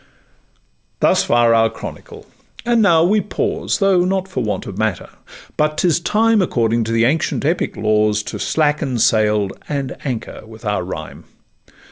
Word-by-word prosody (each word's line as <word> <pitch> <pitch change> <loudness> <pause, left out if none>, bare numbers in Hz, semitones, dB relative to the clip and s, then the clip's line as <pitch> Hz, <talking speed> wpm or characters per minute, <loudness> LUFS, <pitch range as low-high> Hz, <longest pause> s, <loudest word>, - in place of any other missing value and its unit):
Thus - - +3
far 120 -1 +3
our 115 0 +4
chronicle; 110 - -10 0.4
and 235 -1 +3
now 170 -6 +4
we 205 +4 +3
pause, 205 - -2
Though 195 -3 +3
not 190 +1 -1
for 135 -9 -3
want 105 - -3
of 100 - -7
matter; 110 -6 -2 0.5
but 150 0 0
'tis 170 0 +2
time 215 +4 +2
According 115 -8 0
to 115 - -3
the 115 0 +2
ancient 145 +2 0
epic 165 +4 -1
laws, 105 0 +1
To - - -6
slacken 150 -5 0
sail, 105 -3 +2 0.2
and 140 -3 -3
anchor 125 -5 -5
with 110 +1 -13
our 105 -3 -1
rhyme. 80 -4 -8
125 Hz, 155 wpm, -18 LUFS, 110-175 Hz, 0.5 s, our